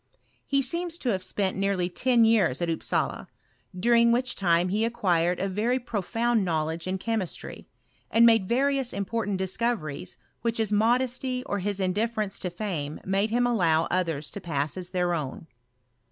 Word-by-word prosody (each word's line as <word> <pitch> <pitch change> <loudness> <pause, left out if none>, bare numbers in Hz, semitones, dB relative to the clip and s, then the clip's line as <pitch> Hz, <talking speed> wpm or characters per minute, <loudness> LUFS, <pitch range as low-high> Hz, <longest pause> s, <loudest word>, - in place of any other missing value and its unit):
He 275 -1 +2
seems 340 +5 -1
to 260 - -2
have 190 -4 0
lis^nt 190 0 -1
nearly 195 -2 0
ten 235 +6 +3
years 220 - +3
at 170 -1 0
Upsala, 165 - -2 0.5
during 235 +3 +4
which 250 +2 +1
time 175 -1 +2
jbe 210 +4 0
acquired 180 -7 +1
a 195 - 0
very 215 +6 0
profound 230 -1 0
knowledge 160 -1 -2
in 190 +1 -1
chemistry, 215 -3 -4 0.4
and 230 +1 +5
made 225 -5 +4
various 270 +1 +1
important 205 0 -2
discoveries, 190 -4 -2 0.2
which 230 -1 -1
his 220 -2 0
modesty 250 +4 +1
or 200 - -2
his 200 +1 -2
indifference 205 +2 -1
to 180 - -2
fame 170 -6 -4
made 195 +3 +1
him 240 +2 +2
allow 165 -9 +2
nthers 165 -5 -1
to 200 - -6
pass 150 -4 -2
as 180 -1 -4
their 180 -1 0
own. 150 -2 -4
200 Hz, 160 wpm, -26 LUFS, 180-235 Hz, 0.5 s, and